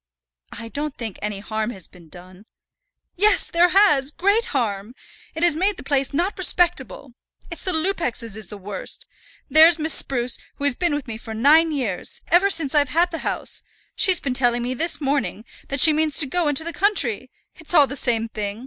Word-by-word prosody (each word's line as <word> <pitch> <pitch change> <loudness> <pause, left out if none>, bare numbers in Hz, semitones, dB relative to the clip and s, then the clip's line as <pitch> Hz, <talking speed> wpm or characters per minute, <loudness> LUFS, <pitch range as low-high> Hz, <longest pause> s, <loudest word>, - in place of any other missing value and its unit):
"I 230 - -9
don't 295 +2 -5
think 225 -5 -7
any 210 -1 -4
harm 215 +1 -3
has 190 -7 -7
been 170 -3 -19
done." 185 +4 -14 0.7
"Yes, 415 +2 +2
there 345 +1 +3
has; 325 -9 +3
great 400 +8 0
harm. 210 0 -3 0.4
It 320 - -3
has 345 -3 +3
made 390 +5 0
the - - -9
place 275 -1 0
not 350 +7 -2
respectable. 340 - 0 0.4
It's 335 - -6
the 370 - -1
Lupexes 315 - -2
is 215 -3 -7
the 210 - -10
worst. 200 0 -8 0.4
There's 320 +1 +6
Miss 315 -1 +2
Spruce, 245 -2 +1 0.2
who - - -9
has 285 -2 +3
been 340 +2 -1
with 290 -2 -5
me 220 -1 -7
for 220 -1 -8
nine 310 +8 +4
years, 240 -11 -4
ever 365 +4 +4
since 325 -7 +2
I've 290 -2 +2
had 345 +4 +1
the 325 - -5
house, - - -3 0.3
she's 375 -5 +4
been 270 - -3
telling 245 -2 +1
me 250 +1 -2
this 330 +6 -1
morning 275 -6 -2 0.2
that 275 - -3
she 310 +3 +7
means 310 -1 0
to 300 - +8
go 335 +4 -1
into 290 +1 +1
the 335 +1 -6
country. 260 - 0 0.3
It's 320 +2 0
all 295 -3 +7
the 275 - -7
same 230 -4 +1
thing. 210 -1 -5
280 Hz, 200 wpm, -21 LUFS, 230-335 Hz, 0.7 s, to